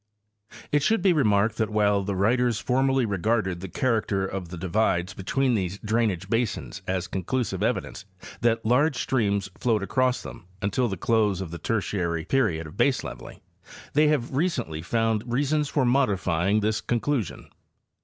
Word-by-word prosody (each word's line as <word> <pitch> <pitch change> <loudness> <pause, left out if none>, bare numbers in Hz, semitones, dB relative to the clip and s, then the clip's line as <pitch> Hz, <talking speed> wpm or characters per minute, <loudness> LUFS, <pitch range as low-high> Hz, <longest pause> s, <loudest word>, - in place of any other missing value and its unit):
It 145 - +3
should 200 +6 +2
be 190 -3 +5
remarked 110 -6 +2
that 110 -2 0
while 105 -2 +2
the 100 0 -3
writers 120 +4 +2
formerly 135 0 +2
regarded 100 -2 0
the 95 - -6
character 110 -4 0
of 95 -2 -5
the 90 - -7
divides 95 +1 0
between 130 +7 0
these 95 -3 -1
drainage 105 -4 -1
basins 115 -3 -2
as 95 -1 -1
conclusive 95 +2 -2
evidence 110 -1 -2 0.3
that 115 -1 +1
large 140 +6 +3
streams 100 -7 0
flowed 110 -5 +1
across 125 +6 +1
them 90 - -10
until 105 +6 0
the 95 -4 -4
close 105 -1 +1
of 95 -4 -5
the 85 - -6
Tertiary 90 -8 -1
period 90 -10 +1
of 75 - -11
baseleveling, - - -1 0.5
they 150 +1 +4
have 140 -4 0
recently 130 - -1
_ - - -12
found 115 +3 0
reasons 145 +3 +1
for 140 -4 +1
modifying 100 -6 +2
this 110 +1 0
conclusion. 120 - -2
110 Hz, 155 wpm, -25 LUFS, 95-125 Hz, 0.5 s, be